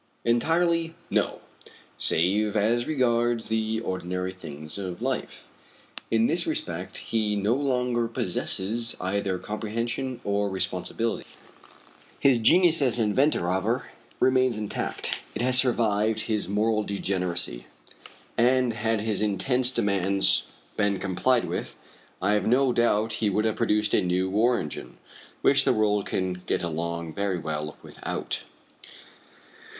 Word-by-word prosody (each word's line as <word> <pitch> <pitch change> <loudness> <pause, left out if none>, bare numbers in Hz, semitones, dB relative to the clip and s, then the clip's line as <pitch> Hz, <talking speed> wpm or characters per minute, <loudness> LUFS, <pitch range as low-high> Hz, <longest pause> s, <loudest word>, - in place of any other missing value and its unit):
"Entirely, 165 +7 +1 0.2
no; - - 0 0.5
save 100 +6 +2
as 115 +4 +1
regards 120 -5 +1
the 110 0 0
ordinary 90 -2 -3
things 80 -1 -6
of 95 -3 -5
life. - - -4 0.6
In 115 0 +3
this 170 - +2
respect 320 -1 -3 0.2
he 105 -2 +1
no 105 +3 +1
longer 125 -3 0
possesses 115 +2 -2
either 95 0 -1
comprehension 115 +5 -4
or 100 0 0
responsibility. 95 +4 -2 0.9
His 135 -4 +4
genius 170 +6 +5
as 125 -4 +2
an 110 -3 +1
inventor, 140 +7 +2
however, 95 +8 -1 0.3
remains 130 -3 +3
intact; 105 -1 -2 0.2
it 110 - -2
has 125 0 +6
survived 110 -3 +2
his 105 -3 0
moral 110 +2 +1
degeneracy, 90 - -1 0.7
and, 125 0 +3
had 110 0 -1
his 105 -2 0
insensate 125 +5 +2
demands 100 -1 +2 0.3
been 105 -2 +2
complied 105 +7 +1
with, - - -4 0.5
I - - +3
have 105 0 +1
no 125 +2 +3
doubt 110 -2 +2
he 105 - +3
would 105 +3 0
have 110 -1 0
produced 105 0 +1
a - - +4
new 90 +1 0
war 120 +4 +3
engine 75 -4 -7 0.5
which - - +5
the - - +3
world 105 -2 +1
can 90 -1 -2
get - - 0
along 85 0 -3
very 100 -1 -1
well 75 -2 -4
without." - - -4
110 Hz, 130 wpm, -26 LUFS, 95-120 Hz, 0.9 s, has